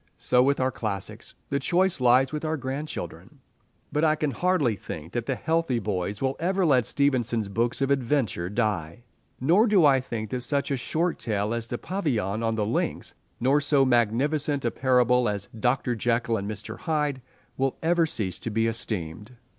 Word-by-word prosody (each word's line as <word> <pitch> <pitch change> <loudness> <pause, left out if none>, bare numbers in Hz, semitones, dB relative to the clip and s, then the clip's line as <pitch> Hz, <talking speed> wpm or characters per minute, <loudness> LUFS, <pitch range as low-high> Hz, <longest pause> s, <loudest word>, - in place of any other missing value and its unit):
So 125 - +3
with 140 +2 +2
our 130 0 +1
classics. 105 -5 -5 0.2
The 140 - +1
choice 175 +1 +1
lies 125 +2 +4
with 150 - -3
our 160 0 -1
grandchildren. 140 +3 -6 0.5
But 150 - 0
I 155 -1 +4
can 150 -2 -1
hardly 160 - +1
think 80 -3 -8
that 120 -1 -3
healthy 160 0 0
boys 100 0 -3
will 135 0 0
ever 185 +2 +1
let 130 -6 +3
Stevenson's 120 -7 +1
books 115 +6 -1
of 135 - 0
adventure 120 -10 0
die, 105 -4 -2 0.4
nor 175 - +4
do 195 -7 +5
I 135 -2 +5
think 110 -4 -5
that 125 - -2
such 140 +3 0
a - - +2
short 165 +7 -1
tale 105 -1 -1
as 115 -1 -3
"The 120 - -3
Pavilion 115 - -2
on 115 -1 0
the 105 -2 0
Links" 110 - -2 0.3
nor 135 +4 +3
so 140 -2 +3
magnificent 135 +4 +1
a 120 - +1
parable 125 -2 +3
as 100 -1 -4
"Dr. 125 +1 +1
Jekyll 115 0 0
and 100 0 -4
Mr. 105 -1 -6
Hyde" 150 -5 -1 0.3
will 135 0 -1
ever 170 0 +3
cease 95 - -1
to - - -4
be 115 +1 +1
esteemed. 105 -1 -3
125 Hz, 180 wpm, -26 LUFS, 110-145 Hz, 0.5 s, do